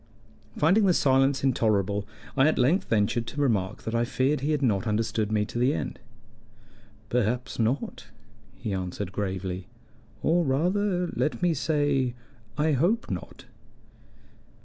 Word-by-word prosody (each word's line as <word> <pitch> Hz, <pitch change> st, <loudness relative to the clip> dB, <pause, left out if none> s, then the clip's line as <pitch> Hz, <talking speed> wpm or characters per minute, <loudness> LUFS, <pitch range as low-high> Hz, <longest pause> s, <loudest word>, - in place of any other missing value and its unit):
Finding 190 Hz, +7 st, +4 dB
the 180 Hz, -, +4 dB
silence 135 Hz, 0 st, +3 dB
intolerable, 105 Hz, -6 st, +1 dB, 0.3 s
I 135 Hz, +2 st, +5 dB
at 155 Hz, -, +2 dB
length 140 Hz, +10 st, +2 dB
ventured 115 Hz, +2 st, +1 dB
to 145 Hz, -, -5 dB
remark 105 Hz, -7 st, 0 dB
that 110 Hz, -, -4 dB
I 115 Hz, 0 st, +2 dB
feared 130 Hz, +4 st, +1 dB
he 145 Hz, -, -1 dB
had 150 Hz, -2 st, 0 dB
not 110 Hz, -2 st, +1 dB
understood 110 Hz, 0 st, 0 dB
me 105 Hz, -1 st, +1 dB
to 120 Hz, -, -5 dB
the 130 Hz, +4 st, +3 dB
end. -, -, -4 dB, 1.1 s
"Perhaps 120 Hz, +1 st, -1 dB
not," 120 Hz, +5 st, -1 dB, 0.5 s
he 105 Hz, -, -4 dB
answered 95 Hz, +1 st, -4 dB
gravely. 95 Hz, -2 st, -3 dB, 0.6 s
"Or, 170 Hz, +2 st, +3 dB
rather 180 Hz, +6 st, +1 dB
let 155 Hz, -, -1 dB
me 175 Hz, -2 st, +3 dB
say, 145 Hz, -4 st, 0 dB, 0.4 s
I 155 Hz, +1 st, +2 dB
hope 175 Hz, -, +1 dB
not." -, -, -7 dB
130 Hz, 140 wpm, -27 LUFS, 105-150 Hz, 1.1 s, I